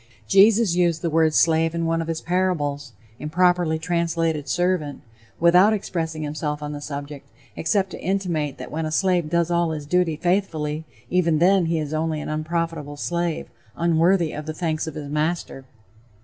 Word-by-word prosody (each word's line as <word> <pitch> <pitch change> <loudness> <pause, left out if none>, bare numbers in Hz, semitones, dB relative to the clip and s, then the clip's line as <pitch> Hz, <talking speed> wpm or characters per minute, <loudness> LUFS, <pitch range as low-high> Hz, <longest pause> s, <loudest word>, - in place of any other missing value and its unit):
Jesus 205 - +5
used 170 -2 +1
the 170 - 0
word 160 0 +3
slave 165 +1 +3
in 165 0 -1
one 165 0 0
of 165 - -5
his 165 -1 -3
parables 150 -7 -1 0.3
(improperly 175 +1 +2
translated 165 -3 -1
servant), 175 -2 -1 0.4
without 180 +5 +5
expressing 160 -6 -3
himself 150 0 -3
on 150 - -4
the 145 -1 -6
subject, 145 -1 -7 0.3
except 190 +3 0
to - - -8
intimate 175 -7 -1
that - - -8
when 160 0 -2
a - - -5
slave 175 -1 +1
does 170 +1 +1
all 170 -1 +2
his 155 -2 -4
duty 175 +1 +1
faithfully, 160 -3 -1 0.3
even 170 -3 +2
then 180 +1 +4
he 165 0 0
is 155 -1 -3
only 155 0 -1
an - - -5
"unprofitable 155 -1 -3
slave," 170 +1 -2 0.3
unworthy 170 0 +2
of 150 0 -7
the 155 - -4
thanks 160 -2 -2
of 160 - -6
his 145 -2 -6
master. 150 -2 -2
165 Hz, 170 wpm, -23 LUFS, 155-175 Hz, 0.4 s, Jesus